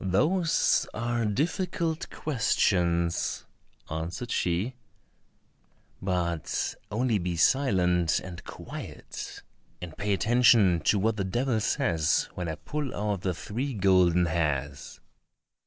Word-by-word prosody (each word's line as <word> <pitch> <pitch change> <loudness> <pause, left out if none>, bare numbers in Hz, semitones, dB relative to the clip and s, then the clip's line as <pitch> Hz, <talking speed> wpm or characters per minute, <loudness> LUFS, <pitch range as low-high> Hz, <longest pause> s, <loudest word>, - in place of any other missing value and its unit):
"Those 160 - +2
are 120 +1 -1
difficult 165 - -1
questions," 85 - 0 0.4
answered 85 +9 -4
she, 90 +8 0 1.3
"but 85 -4 -1 0.2
only 115 0 +1
be 85 -1 -2
silent 90 - +3
and 90 -1 -9
quiet - - -8 0.4
and 85 -3 -8
pay 100 +1 -1
attention 105 -3 +4
to 105 - +4
what 110 +2 +1
the 100 - 0
devil 120 +5 0
says 85 - +1
when 90 -2 -4
I 80 - -3
pull 130 - -4
out 105 -2 -2
the 90 -2 -1
three 125 - -4
golden 90 -3 +4
hairs." 75 -4 -2
95 Hz, 105 wpm, -28 LUFS, 85-120 Hz, 1.3 s, attention